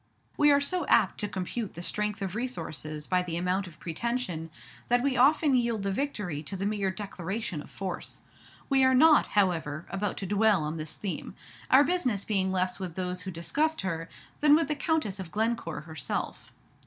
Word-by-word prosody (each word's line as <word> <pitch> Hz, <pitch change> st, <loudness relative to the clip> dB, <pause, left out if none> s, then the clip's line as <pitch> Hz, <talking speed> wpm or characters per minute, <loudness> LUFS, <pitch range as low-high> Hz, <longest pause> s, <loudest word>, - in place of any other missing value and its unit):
We 295 Hz, -, +5 dB
are 285 Hz, -, +5 dB
so 305 Hz, +2 st, -1 dB
apt -, -, +3 dB
to 210 Hz, -, -1 dB
compute 200 Hz, +3 st, -4 dB
the 170 Hz, -, -6 dB
strength 210 Hz, +2 st, -1 dB
of 190 Hz, -2 st, -3 dB
resources 155 Hz, -, -4 dB
by 180 Hz, +2 st, +2 dB
the 170 Hz, -2 st, -3 dB
amount 180 Hz, +2 st, 0 dB
of 160 Hz, -4 st, -14 dB
pretension 175 Hz, -2 st, -3 dB, 0.4 s
that 245 Hz, 0 st, +3 dB
we 275 Hz, -1 st, +1 dB
often 280 Hz, +3 st, +4 dB
yield 235 Hz, -4 st, +1 dB
the 200 Hz, -, 0 dB
victory 200 Hz, -, -2 dB
to 160 Hz, +6 st, -5 dB
the 195 Hz, -, -2 dB
mere 205 Hz, -2 st, 0 dB
declaration 190 Hz, -2 st, -4 dB
of -, -, -13 dB
force. 190 Hz, -2 st, -6 dB, 0.4 s
We 270 Hz, -1 st, +4 dB
are 260 Hz, 0 st, +5 dB
not, 310 Hz, +3 st, +6 dB
however, 165 Hz, -5 st, +1 dB
about 195 Hz, +1 st, -2 dB
to 195 Hz, -, -4 dB
dwell 205 Hz, -2 st, +3 dB
on 155 Hz, +2 st, -3 dB
this 155 Hz, -1 st, -6 dB
theme, 200 Hz, -3 st, -5 dB, 0.3 s
our 265 Hz, +2 st, +7 dB
business 255 Hz, -, 0 dB
being 190 Hz, -3 st, +1 dB
less 185 Hz, 0 st, 0 dB
with 180 Hz, -4 st, -5 dB
those 180 Hz, -1 st, -3 dB
who 190 Hz, -, -6 dB
discussed 295 Hz, -, 0 dB
her, 165 Hz, -3 st, -3 dB, 0.3 s
than 295 Hz, 0 st, +6 dB
with 315 Hz, -2 st, +1 dB
the 300 Hz, -, +1 dB
Countess 290 Hz, -, -1 dB
of 185 Hz, -3 st, -6 dB
Glencore 220 Hz, -4 st, -1 dB
herself. 155 Hz, -3 st, -4 dB
195 Hz, 190 wpm, -29 LUFS, 180-250 Hz, 0.4 s, our